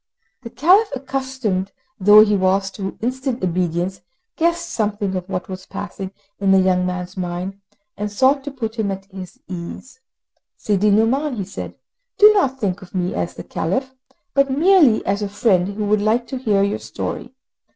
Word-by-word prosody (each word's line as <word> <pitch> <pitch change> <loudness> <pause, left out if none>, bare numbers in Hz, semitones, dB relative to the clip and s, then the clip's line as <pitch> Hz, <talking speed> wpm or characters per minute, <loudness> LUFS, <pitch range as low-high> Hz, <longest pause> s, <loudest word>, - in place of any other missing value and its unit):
The 235 - -8
Caliph, 375 - +4
accustomed 260 -8 -3 0.3
though 210 +2 +8
he 210 -1 +2
was 195 +1 +1
to 195 -1 -6
instant 255 0 -2
obedience, 180 +1 -1 0.3
guessed 340 +1 0
something 205 -3 -1
of 185 +1 -4
what 180 -2 -3
was 185 0 -8
passing 195 -1 -6 0.3
in 200 -1 +1
the 195 0 +6
young 185 -1 +2
man's 180 0 -4
mind, 185 +2 -4 0.3
and 210 0 -4
sought 265 +6 +3
to 285 - -4
put 230 -4 -5
him 210 -2 0
at 195 0 -5
his 190 -2 -9
ease. 185 +8 -8 0.6
"Sidi 210 0 +1
Nouman," 245 +7 +2
he 205 - -3
said, 195 - -7 0.4
"do 425 0 +8
not 270 -10 +1
think 200 -3 -2
of 185 0 -13
me 180 -1 -1
as 90 -1 -3
the - - -7
Caliph, 260 +11 -2 0.4
but 275 0 +3
merely 300 - +4
as 200 +2 0
a 205 - -2
friend 195 -4 +2
who 205 +1 -3
would 210 0 +2
like 225 +3 +1
to 260 - -4
hear 205 -5 +2
your 200 +2 -1
story. 255 +1 -6
205 Hz, 175 wpm, -20 LUFS, 190-260 Hz, 0.6 s, though